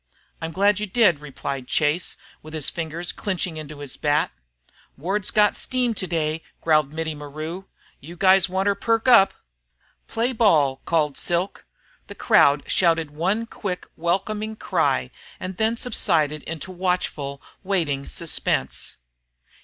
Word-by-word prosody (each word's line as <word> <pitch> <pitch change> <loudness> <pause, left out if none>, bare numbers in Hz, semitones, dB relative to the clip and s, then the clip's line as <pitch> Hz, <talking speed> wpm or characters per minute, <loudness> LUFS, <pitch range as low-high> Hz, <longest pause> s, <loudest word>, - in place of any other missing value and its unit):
"I'm 165 0 -3
glad 200 +3 +3
you 210 - -2
did," 190 -7 +4
replied 140 -2 -5
Chase, 155 +3 0 0.2
with 155 +1 -9
his 155 -3 +1
fingers 170 +1 -3
clenching 185 -4 -3
into 150 -1 -8
his 140 -3 -5
bat. 150 0 +1 0.7
"Ward's 190 +7 0
got 210 -1 +3
steam 250 -2 0
today," 165 -5 -2 0.2
growled 155 -3 +2
Mittie 160 0 -3
maru. 155 +5 -7 0.3
"You 165 +5 -10
guys 190 0 +5
want 190 +2 0
'er 200 - +4
perk 225 +4 0
up!" 215 -6 +7 0.8
"Play 235 +3 0
ball!" 150 - +3
called 150 -4 +1
Silk. 175 +3 -2 0.4
The - - -9
crowd 140 0 +4
shouted 165 -4 +2
one 190 +9 0
quick 195 -5 -5
welcoming 210 +6 -1
cry - - 0 0.3
and 185 0 -5
then 225 +1 +1
subsided 155 - +1
into 165 +3 -5
watchful 175 -6 -2 0.2
waiting 160 -8 -1
suspense. 170 -2 -1
170 Hz, 135 wpm, -23 LUFS, 155-195 Hz, 0.8 s, up